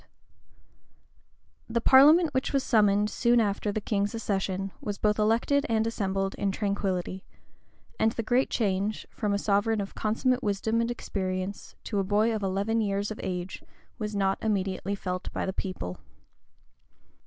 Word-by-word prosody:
} - - -39 0.7
THE 235 +1 +1
parliament 295 +7 +6
which 260 +2 -1
was 275 -1 +2
summoned 210 -2 +3
soon 240 0 +3
after 205 -1 0
the 215 - -2
king's 205 0 -1
accession, 195 -3 -2
was 205 -7 -4
both 210 0 +1
elected 230 +7 +2
and 220 -1 +2
assembled 195 -3 -1
in 200 - +1
tranquillity; 190 -2 -2 0.8
and 220 - +3
the 230 - -3
great 245 +4 +2
change, 205 -1 -1
from 210 -2 -2
a 200 - +2
sovereign 205 +2 +1
of 195 -1 -4
consummate 250 +4 0
wisdom 220 +1 0
and 230 - -1
experience 190 -4 -4
to 205 - -2
a - - +1
boy 210 +4 +2
of 215 - -2
eleven 200 +4 0
years 200 0 -1
of 215 - -6
age, 180 0 -4 0.4
was 210 -1 -3
not 195 -1 +1
immediately 200 -2 -1
felt 185 -2 -4
by - - -2
the 190 - -2
people. 180 - -5
205 Hz, 155 wpm, -28 LUFS, 195-225 Hz, 0.8 s, parliament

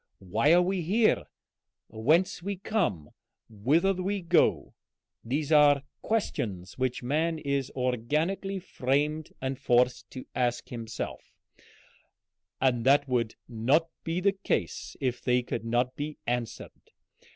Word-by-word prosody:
Why 115 - +3
we 185 +2 +2
are - - -1
here, 215 +7 +2 0.6
whence 150 +14 +1
we 200 +3 -3
come, 175 - -1 0.4
whither 145 - +2
we 195 +2 -2
go 170 - +2 0.5
these 145 +5 -2
are 145 -2 +6 0.2
questions 100 - -2
which 130 -1 -2
man 160 +6 0
is 140 -3 -1
organically 150 - -1
framed 150 -2 -1
and 130 0 -2
forced 125 +1 +2
to 130 - -8
ask 120 -1 -1
himself, 115 -2 -6 1.2
and 125 -3 +2
that 140 +2 +4
would 120 -3 0
not 130 +9 +2
be 165 +2 -1
the 195 +2 +2
case 140 - -2
if 125 -2 -1
they 125 0 +2
could 120 -1 -4
not 120 +2 0
be 150 +1 -5
answered. 120 -1 -3
135 Hz, 125 wpm, -28 LUFS, 120-165 Hz, 1.2 s, are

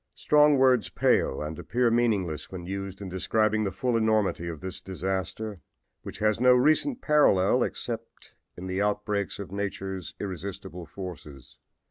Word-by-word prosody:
Strong 150 -1 +4
words 130 -4 +4
pale 65 - +1
and 75 +1 -6
appear 120 -1 +1
meaningless 100 -10 0
when 90 -2 -7
used 95 +1 -5
in - - -5
describing 110 +3 +1
the 95 - -1
full 120 +5 -1
enormity 110 -6 +1
of 80 -3 -5
this 95 +1 -6
disaster, 95 +2 -4 0.4
which - - -8
has 110 0 +1
no 125 0 +6
recent 155 - +2
parallel 125 -11 +4
save - - -3 0.6
in 90 - -7
the 95 +1 -2
outbreaks 105 -1 -1
of 100 -2 -7
nature's 95 -2 -4
irresistible 90 -3 -6
forces. 75 -9 -9
100 Hz, 145 wpm, -27 LUFS, 95-110 Hz, 0.6 s, no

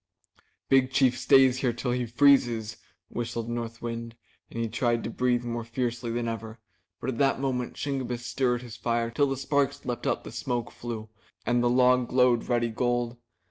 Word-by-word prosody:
"Big 135 -1 +4
Chief 130 -2 +3
stay 135 +1 +6
here 125 0 0
till 120 +2 -3
he 125 -1 -1
freezes," 120 -4 +3 0.3
whistled 115 -1 -4
North 115 -1 -5
Wind, 115 0 -5 0.3
and 115 - -6
he 115 - 0
tried 120 +1 0
to - - -4
breathe 125 0 +1
more 120 -1 -3
fiercely 120 0 -3
than 120 0 -2
ever. 115 -1 -5 0.4
But 130 - -2
at 115 - -6
that 135 -1 +3
moment 130 -3 -2
Shingebiss 125 -4 -3
stirred 125 -2 0
his 120 -3 -9
fire 115 -1 -1
till 145 +4 +2
the 135 - -2
sparks 140 +1 0
leaped 120 -1 -3
up - - 0
the - - -8
smoke 120 -2 -3
flue 115 -2 -6 0.4
and 120 0 +2
the 120 - +3
log 125 0 +4
glowed 125 -2 +3
ruddy 120 -1 +2
gold. 120 +1 -1
120 Hz, 180 wpm, -27 LUFS, 115-125 Hz, 0.4 s, stay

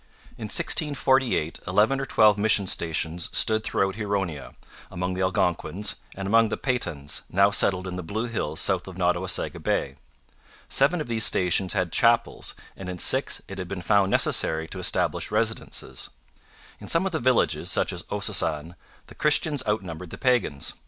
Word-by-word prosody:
In - - -7
1648 130 - +1
eleven 105 +9 +2
or 135 - -4
twelve 110 -3 +5
mission 105 -1 +2
stations 85 -1 -1
stood 110 0 +2
throughout 95 -2 0
Huronia, 95 -9 -3 0.3
among 90 +1 -3
the 95 - -3
Algonquins, 95 +2 0 0.2
and 95 0 -5
among 115 +2 +4
the - - -3
Petuns, 85 - -3
now 100 +2 +3
settled 95 -2 +2
in 90 0 -5
the - - -4
Blue 105 +7 -3
Hills 105 -10 -3
south 95 -1 +2
of 95 - -9
Nottawasaga 90 0 0
Bay. 70 0 -1 0.7
Seven 155 +5 +2
of - - -5
these 115 -1 0
stations 90 -1 +2
had 90 -4 -1
chapels 115 0 +2 0.2
and 95 -1 -8
in 90 - -5
six - - +1
it 95 0 -8
had 90 - -5
been 90 -1 -6
found 100 -1 +3
necessary 80 -4 +2
to - - -6
establish - - 0
residences. - - -2 0.7
In - - -10
some 170 +3 +2
of 190 - -1
the 160 - -1
villages, 130 0 +1
such - - 0
as - - -5
Ossossane, 75 +3 0 0.3
the - - -14
Christians 150 -1 +2
outnumbered 90 -5 -3
the - - -9
pagans. 120 - 0
95 Hz, 165 wpm, -25 LUFS, 90-115 Hz, 0.7 s, twelve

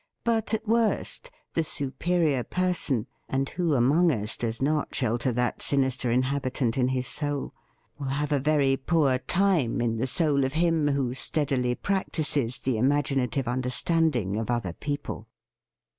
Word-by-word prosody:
But, 225 -1 +1
at 220 - -6
worst, 230 - 0 0.2
the 165 - +1
superior 150 -1 +1
person 175 -11 0
— - - -44
(and 135 +1 0
who 170 -4 0
among 150 +8 +4
us 105 -4 -1
does 115 -1 -3
not 150 +2 0
shelter 120 0 0
that 125 +1 -1
sinister 130 -3 +1
inhabitant 130 -1 0
in 125 -2 +2
his 130 -1 -1
soul?) 145 +1 -3 0.2
— - - -40
will 140 - -4
have 145 +2 -1
a 145 - +2
very 140 -1 +2
poor 140 -3 +2
time 175 -9 +1
in 115 -1 0
the 125 +4 0
soul 145 -1 +2
of 130 - -1
him 165 -2 +2
who 135 -4 0
steadily 135 -3 +1
practises 150 - -1
the 130 -4 -1
imaginative 135 -2 +1
understand 130 +6 +1
ing 100 -3 -1
of 110 +1 -3
other 120 -8 -1
people. 145 - -5
135 Hz, 160 wpm, -26 LUFS, 125-155 Hz, 0.2 s, among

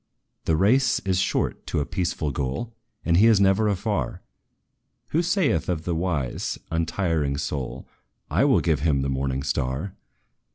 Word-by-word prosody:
"The 80 - +2
race 125 +9 +3
is 95 -1 0
short 95 - -1
to - - -1
a 70 - 0
peaceful 85 -5 -2
goal, 70 - -3 0.3
And 85 0 +3
He 110 +5 +6
is 110 -3 +5
never 100 +2 +3
afar, 100 0 -2 0.9
Who 165 - +2
saith 175 - +1
of 80 -3 -1
the 85 - -1
wise, 80 -7 -2
untiring 80 -3 0
soul, 70 -3 -4 0.4
'I - - +3
will - - +4
give 80 -4 +1
him 70 -3 +1
the 70 - -1
morning 65 0 -1
star!' 70 +5 -2
85 Hz, 155 wpm, -25 LUFS, 70-100 Hz, 0.9 s, He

